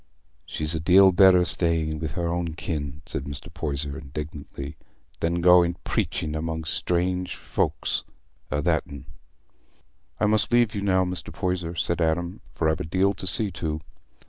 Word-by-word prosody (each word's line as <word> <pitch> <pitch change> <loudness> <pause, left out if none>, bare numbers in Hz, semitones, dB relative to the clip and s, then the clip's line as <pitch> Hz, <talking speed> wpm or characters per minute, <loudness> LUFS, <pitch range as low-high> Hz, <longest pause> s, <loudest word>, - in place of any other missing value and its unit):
"She'd 75 +1 0
a 80 - -1
deal 95 +4 +6
better 95 0 +7
be - - +2
staying 80 -3 +2
wi' 80 - -2
her 85 +3 -3
own 85 -1 -2
kin," 75 -3 -4
said - - -5
Mr. 70 +2 -7
Poyser, 70 -4 -3
indignantly, 70 0 -7 0.4
"than 85 +1 0
going 90 -1 +5
preaching 75 - -2
among 80 +1 -3
strange 90 +2 -1
folks - - -1 0.5
a 75 -1 -1
that'n." 70 -2 -1 1.1
"I - - +2
must 105 +1 +2
leave 120 -2 +3
you 100 - -3
now, 95 -2 +2
Mr. 90 0 -3
Poyser," 90 -2 -2
said 85 +1 0
Adam, 85 +2 -1
"for 80 - 0
I've 80 0 +1
a - - -2
deal 95 +5 +1
to 95 -2 -6
see 105 0 +3
to." 80 -3 -3
85 Hz, 160 wpm, -25 LUFS, 80-90 Hz, 1.1 s, better